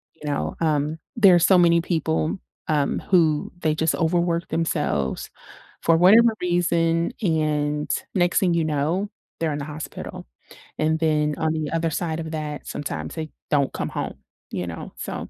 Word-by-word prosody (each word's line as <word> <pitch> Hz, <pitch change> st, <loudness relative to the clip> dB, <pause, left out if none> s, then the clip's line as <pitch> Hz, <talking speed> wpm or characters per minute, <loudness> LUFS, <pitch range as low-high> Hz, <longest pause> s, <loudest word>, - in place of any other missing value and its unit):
you 150 Hz, -2 st, -9 dB
know? 145 Hz, -, -2 dB
Um, 155 Hz, 0 st, +1 dB, 0.2 s
there's 185 Hz, -6 st, +6 dB
so 190 Hz, -, +6 dB
many 170 Hz, -1 st, +5 dB
people, 160 Hz, 0 st, -1 dB, 0.3 s
um, 145 Hz, -2 st, +1 dB
who 160 Hz, -5 st, +3 dB
they 155 Hz, -2 st, +1 dB
just 160 Hz, +1 st, +1 dB
overwork 170 Hz, 0 st, +1 dB
themselves 145 Hz, -, -1 dB, 0.5 s
for 165 Hz, 0 st, +4 dB
whatever 220 Hz, +6 st, +6 dB
reason, 170 Hz, 0 st, +1 dB
and 150 Hz, -3 st, 0 dB, 0.3 s
next 175 Hz, -2 st, +3 dB
thing 180 Hz, -3 st, +2 dB
you 165 Hz, -, +2 dB
know, 155 Hz, +7 st, 0 dB, 0.3 s
they're 160 Hz, -2 st, 0 dB
in 145 Hz, -, -3 dB
the 140 Hz, -, -4 dB
hospital. 150 Hz, 0 st, -7 dB, 0.5 s
And 160 Hz, +1 st, +1 dB
then 150 Hz, -2 st, +1 dB
on 160 Hz, 0 st, 0 dB
the 155 Hz, -2 st, -3 dB
other 165 Hz, 0 st, 0 dB
side 160 Hz, 0 st, -2 dB
of 160 Hz, -1 st, -5 dB
that, 150 Hz, -2 st, -5 dB
sometimes 145 Hz, -, -4 dB
they 160 Hz, -1 st, -4 dB, 0.2 s
don't 140 Hz, -3 st, +2 dB
come -, -, -3 dB
home, -, -, -4 dB, 0.4 s
you 90 Hz, -, -3 dB
know? 80 Hz, -1 st, -7 dB
So -, -, -5 dB
160 Hz, 160 wpm, -23 LUFS, 150-170 Hz, 0.5 s, there's